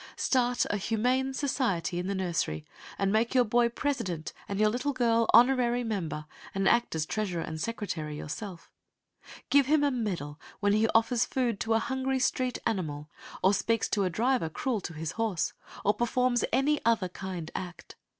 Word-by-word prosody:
Start 245 -2 +1
a 205 - 0
humane 250 +6 0
society 235 - -1
in 180 - -3
the 200 - -1
nursery 170 - -2 0.3
and 195 0 +1
make 230 +4 +1
your 250 - +6
boy 235 +1 +3
president 230 - -3 0.2
and 200 0 -2
your 215 0 +5
little 250 +6 -1
girl 230 -2 +2
honorary 245 -1 +5
member, 175 -9 -3 0.3
and 195 0 +1
act 235 -7 +3
as 155 -1 0
treasurer 185 -3 -2
and 160 0 -5
secretary 165 -9 -3
yourself. 175 +4 -7 0.8
Give 280 -2 +5
him 300 0 +4
a 285 - +3
medal 180 - -3 0.2
when 205 -1 +2
he 215 +1 +3
offers 230 +1 +3
food 240 -6 -1
to 225 0 +1
a - - +5
hungry 265 +1 -1
street 255 -1 0
animal 155 -9 -2 0.3
or 190 - +5
speaks 225 +3 +1
to 205 - +1
a 185 - +1
driver 235 -2 +1
cruel 225 +6 -2
to 175 - -6
his 160 0 -3
horse, 220 -7 -1 0.3
or 205 - +4
performs 245 +1 +1
any 280 +4 +2
other 225 -5 +2
kind 180 -3 -6
act. 175 -2 -7
225 Hz, 175 wpm, -29 LUFS, 180-245 Hz, 0.8 s, your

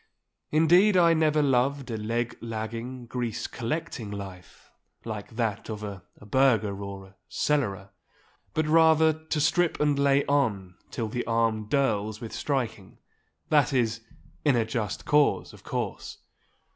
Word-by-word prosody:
Indeed 175 +6 +5
I 170 -2 +6
never 155 -2 +2
loved 135 0 +1
a - - -2
leg 115 +2 -2
lagging, 115 +2 -5
grease 120 -2 -3
collecting 120 -3 -4
life, 95 -3 -9 0.3
like 110 -1 -6
that 115 -3 -2
of 105 -1 -5
a 100 -3 -6 0.2
burgher 105 -3 +2
or 100 -1 -7
a 95 0 -20
cellarer. 100 -10 -1 0.6
But 155 - +1
rather 160 0 +5
to 160 0 -4
strip 170 +3 +2
and 145 -1 +2
lay 140 0 +3
on 110 -11 0 0.2
till 115 - -3
the 120 +3 -3
arm 115 -2 +1
dirls 110 -6 0
with 115 - -8
striking—that 120 - -2
is, 115 -3 +1 0.4
in 145 -4 +4
a 115 -2 +2
just 110 -3 -3
cause, 150 -1 +2
of - - -14
course. - - -4
120 Hz, 135 wpm, -27 LUFS, 105-145 Hz, 0.6 s, I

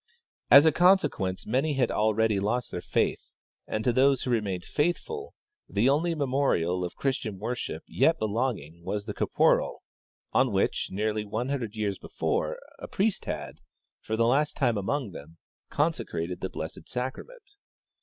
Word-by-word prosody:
As 140 +2 +9
a 160 - +6
consequence 150 - +2
many 135 +6 +1
had 130 -3 +1
ah 110 +1 +2
eady 110 -3 +3
lost 110 +5 -1
their 90 - -4
faith, - - 0 0.5
and 110 - -2
to 125 - +2
those 135 +1 +4
who 125 - -2
remained 100 -6 -1
faithful 425 - -2 0.3
the 110 +6 +2
only 165 +4 +2
memorial 130 - +1
of 90 - -5
Christian 120 -7 -2
worship 120 +5 -4
3^et 160 +5 +3
belonging 105 - -2
was 105 +3 -3
the 105 - -4
coporal - - +1 0.5
on - - +3
which, - - +1
nearly 105 +2 -1
one 110 +5 -3
hun 140 0 0
dred 115 -3 -6
years 105 -3 -2
before, - - -2 0.2
a - - -7
priest 205 +1 0
had, - - -5 0.4
for 110 - -3
the 115 - +3
last 140 +5 +2
time 125 -5 +2
among 110 +3 -2
them, 80 0 -11 0.3
consecrated 90 - -1
the - - -2
blessed - - -7
sacrament. 410 - -6
120 Hz, 160 wpm, -28 LUFS, 105-145 Hz, 0.5 s, As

